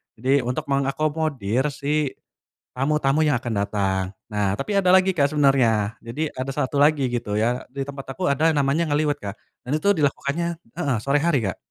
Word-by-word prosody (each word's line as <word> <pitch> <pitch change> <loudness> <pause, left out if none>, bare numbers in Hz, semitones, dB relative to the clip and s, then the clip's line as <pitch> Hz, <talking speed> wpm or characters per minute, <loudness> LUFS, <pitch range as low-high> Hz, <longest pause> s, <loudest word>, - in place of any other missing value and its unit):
jadi 130 +5 +2
untuk 125 +5 -2
mengakomodir 140 -3 0
si, 145 0 -1 0.6
tamu-tamu 140 +2 +1
yang 145 - +3
akan 120 -1 -4
datang 100 -2 0 0.3
nah 100 -2 0
tapi 135 - -4
ada 185 -2 +2
lagi 190 0 +4
Kak 145 -5 +3
sebenernya 120 -7 +3
jadi 145 +7 -4
ada 130 +1 -4
1 140 +2 -1
lagi 145 -2 +4
gitu 115 -4 -2
ya 120 +4 0
di 135 +1 -4
tempat 135 -1 -8
aku 185 - -4
ada 155 +3 +3
namanya 145 +4 +1
ngeliwet 145 0 +1
Kak 100 0 -6 0.3
dan - - -3
itu 200 +6 +2
dilakukannya 145 +3 0 0.3
heeh, 140 -3 +1
sore 140 +1 +2
hari 155 -7 +2
Kak. 95 - -3
140 Hz, 175 wpm, -23 LUFS, 120-150 Hz, 0.6 s, lagi